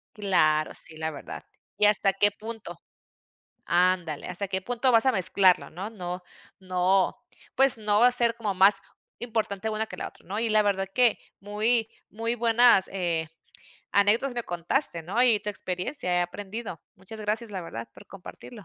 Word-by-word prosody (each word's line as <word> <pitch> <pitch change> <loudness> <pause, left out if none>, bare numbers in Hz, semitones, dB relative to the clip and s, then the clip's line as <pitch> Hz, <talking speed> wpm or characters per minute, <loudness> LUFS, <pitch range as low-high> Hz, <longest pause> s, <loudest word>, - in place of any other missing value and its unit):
Claro, 155 -7 0
sí, 155 - +3
la 160 0 -3
verdad. 140 - -10 0.3
¿Y 210 - +3
hasta 200 -2 +3
qué 205 +1 +2
punto? 215 -5 -9 0.9
ándale, 175 -3 0
hasta 200 - -5
qué 190 0 -3
punto 245 +2 -1
vas 230 +1 +4
a 260 - +3
mezclarlo, 185 -2 +4
¿no? 195 +6 -8
No, 180 -3 -7 0.4
no, 185 +2 0 0.4
pues, 270 -2 +9
no 210 -1 0
va 245 - +6
a - - +2
ser 235 -2 +1
como 210 -4 -4
más 195 +2 +5 0.4
importante 220 -3 -3
una 215 +1 -2
que - - -11
la - - -6
otra, - - -19
¿no? 200 +4 -5
Y 230 -1 -2
la 215 0 +2
verdad 195 -1 -1
que 240 0 +2 0.2
muy, 220 +3 0 0.2
muy 230 +2 -3
buenas, 235 -3 +3
eh, 170 -4 -3 0.6
anécdotas 220 +6 +1
me 240 - -4
contaste, 175 - -3
¿no? 200 +8 -2
Y 225 -5 +3
tu 210 - -5
experiencia 185 +1 -3
he 175 - +1
aprendido. 200 +1 -7 0.2
Muchas 195 +4 -11
gracias, 215 +1 -4
la 190 - -5
verdad, 115 -9 -9
por - - -17
compartirlo. 195 +5 -13
205 Hz, 175 wpm, -25 LUFS, 180-225 Hz, 0.9 s, pues